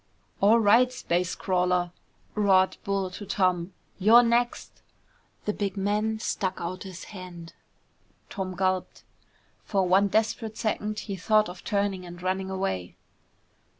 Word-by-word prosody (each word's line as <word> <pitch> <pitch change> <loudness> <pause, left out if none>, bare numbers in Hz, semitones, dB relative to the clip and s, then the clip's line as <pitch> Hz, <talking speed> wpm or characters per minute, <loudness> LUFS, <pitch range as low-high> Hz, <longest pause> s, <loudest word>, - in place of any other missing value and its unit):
"All 215 +4 +5
right, 230 +4 +5
space 180 -7 -1
crawler," 180 -1 +1 0.4
roared 190 -3 +3
Bull 195 -2 -1
to 195 - -8
Tom, 185 -5 0 0.3
"you're 225 +5 +7
next!" 240 +1 0 0.6
The 210 - 0
big 200 -2 -3
man 210 +3 0
stuck 190 -3 -2
out 180 +2 -5
his 185 -2 -8
hand. 175 -3 -9 0.7
Tom 185 -2 -5
gulped. 185 0 -1 0.6
For 195 -3 0
one 195 +3 +4
desperate 220 +1 -1
second 215 -1 -2
he 200 - -5
thought 215 +2 +2
of 180 0 -10
turning 200 -3 -1
and 175 0 -10
running 190 +1 -2
away. 95 - -3
195 Hz, 130 wpm, -27 LUFS, 185-215 Hz, 0.7 s, you're